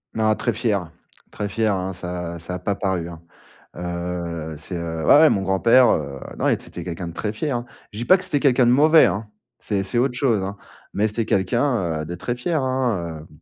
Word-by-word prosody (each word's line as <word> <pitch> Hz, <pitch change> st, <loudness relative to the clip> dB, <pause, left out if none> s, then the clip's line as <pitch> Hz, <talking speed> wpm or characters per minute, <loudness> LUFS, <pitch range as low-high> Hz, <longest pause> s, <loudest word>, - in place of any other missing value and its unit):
Non 110 Hz, -1 st, +2 dB
très 120 Hz, -, -1 dB
fier, 100 Hz, -7 st, -1 dB, 0.4 s
très 105 Hz, -1 st, -4 dB
fier, 110 Hz, -2 st, +1 dB
hein, 95 Hz, 0 st, -2 dB
ça 90 Hz, -1 st, -5 dB
ça 85 Hz, +2 st, -7 dB
a -, -, -5 dB
pas 100 Hz, +2 st, -1 dB
paru, 95 Hz, -4 st, -2 dB
hein, 85 Hz, -, -10 dB, 0.6 s
heu, 85 Hz, -2 st, -4 dB
c'est, 90 Hz, +4 st, -7 dB
heu, 80 Hz, -1 st, -4 dB
ouais, 80 Hz, -, -3 dB
ouais 155 Hz, +2 st, +8 dB
mon 95 Hz, -, +1 dB
grand-père, 115 Hz, +7 st, +4 dB
heu, 70 Hz, -3 st, -1 dB, 0.2 s
non, -, -, 0 dB
et -, -, +4 dB
t -, -, -13 dB
c'était -, -, -8 dB
quelqu'un 85 Hz, 0 st, -5 dB
de 85 Hz, -, -7 dB
très 105 Hz, +4 st, -3 dB
fier, 135 Hz, +3 st, -2 dB
hein. 120 Hz, -, -6 dB, 0.3 s
Je 105 Hz, -, -10 dB
dis 120 Hz, -, -3 dB
pas 185 Hz, -, +7 dB
que 185 Hz, -, -7 dB
c'était 145 Hz, -5 st, 0 dB
quelqu'un 130 Hz, -3 st, +4 dB
de -, -, +5 dB
mauvais, 155 Hz, +3 st, +6 dB
hein, 105 Hz, +2 st, -1 dB, 0.3 s
c'est 100 Hz, -2 st, -2 dB
c'est 95 Hz, +5 st, -3 dB
autre 125 Hz, +1 st, +2 dB
chose, 120 Hz, -6 st, +1 dB
hein. 100 Hz, +1 st, -4 dB, 0.4 s
Mais 105 Hz, +2 st, +1 dB
c'était 110 Hz, +1 st, -2 dB
quelqu'un, 95 Hz, -, 0 dB
heu, -, -, -7 dB
de 85 Hz, -, -6 dB
très 120 Hz, +7 st, -3 dB
fier, 150 Hz, +4 st, -1 dB
hein, 110 Hz, -12 st, -1 dB
hem. -, -, -16 dB
100 Hz, 235 wpm, -22 LUFS, 85-120 Hz, 0.6 s, ouais